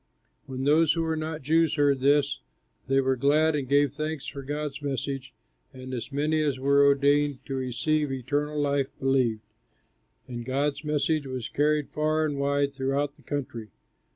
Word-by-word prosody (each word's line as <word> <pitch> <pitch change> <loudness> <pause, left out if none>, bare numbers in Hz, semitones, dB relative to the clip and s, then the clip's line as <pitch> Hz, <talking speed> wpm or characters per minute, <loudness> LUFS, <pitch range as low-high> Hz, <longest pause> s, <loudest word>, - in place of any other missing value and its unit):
'" - - -45
When 130 0 -5
those 155 +3 +4
who 165 - -1
were 160 0 -1
not 155 -1 -4
Jews 160 +2 +2
heard 145 -3 +3
this, 140 - +2 0.5
they 135 +1 +3
were 130 0 +1
glad 150 +4 +3
and 135 -3 -3
gave 140 -1 +3
thanks 155 -1 -4
for 140 - -6
God's 145 +1 -4
message; 135 -1 -3 0.4
and 130 0 -8
as 125 +3 -5
many 155 +3 +1
as 145 -4 0
were 140 +2 +3
ordained 140 0 +2
to 135 - -5
receive 135 +3 -1
eternal 145 +4 -2
life 140 -2 +1
believed, 130 -5 +1 0.9
and 120 -2 -6
God's 140 +4 -1
message 150 0 0
was 130 -3 -5
carried 150 0 +1
far 155 +1 +1
and 145 -2 -3
wide 140 0 +1
throughout 140 +1 -1
the 150 - -22
country. 125 -7 -5
140 Hz, 170 wpm, -27 LUFS, 135-150 Hz, 0.9 s, those